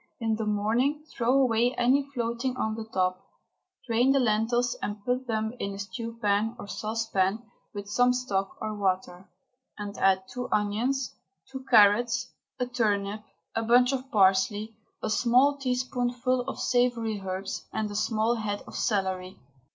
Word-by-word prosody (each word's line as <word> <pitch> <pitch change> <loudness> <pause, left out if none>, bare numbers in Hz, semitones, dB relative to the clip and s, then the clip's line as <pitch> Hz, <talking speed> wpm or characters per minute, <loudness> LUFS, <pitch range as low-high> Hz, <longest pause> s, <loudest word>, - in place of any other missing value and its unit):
In 225 -2 0
the 220 -1 -3
morning 235 +9 +1
throw 240 0 +1
away 245 -1 +2
any 270 +3 +2
floating 235 +2 -2
on 220 -3 -1
the 220 0 -5
top. 185 -1 0 0.6
Drain 240 +2 +3
the 275 - +3
lentils 240 +1 +1
and 205 0 -5
put 250 +1 -1
them 220 0 -1
in 200 0 -3
a - - -8
stew 225 +4 -6
pan 210 +2 +1
or - - -8
saucepan 215 -1 -1 0.3
with 200 0 -6
some 245 +4 +3
stock 205 -6 -2
or 215 - -3
water, 185 -2 -2 0.5
and 205 -1 -6
add 190 -1 +3
two 250 0 -5
onions, 230 +6 0 0.4
two 265 -1 -7
carrots, 210 +3 +5 0.3
a 250 - +1
turnip, 210 -4 -1 0.3
a 225 - +1
bunch 245 +3 +4
of 265 0 -4
parsley, 205 +1 +2 0.3
a - - -1
small 255 +6 +4
teaspoonful 250 -1 -1
of - - -5
savoury 240 -4 +1
herbs 190 +1 -4
and 215 -1 -2
a - - -6
small 220 +2 +1
head 205 -2 -3
of - - -12
celery. 190 -3 -1
225 Hz, 155 wpm, -27 LUFS, 205-245 Hz, 0.6 s, carrots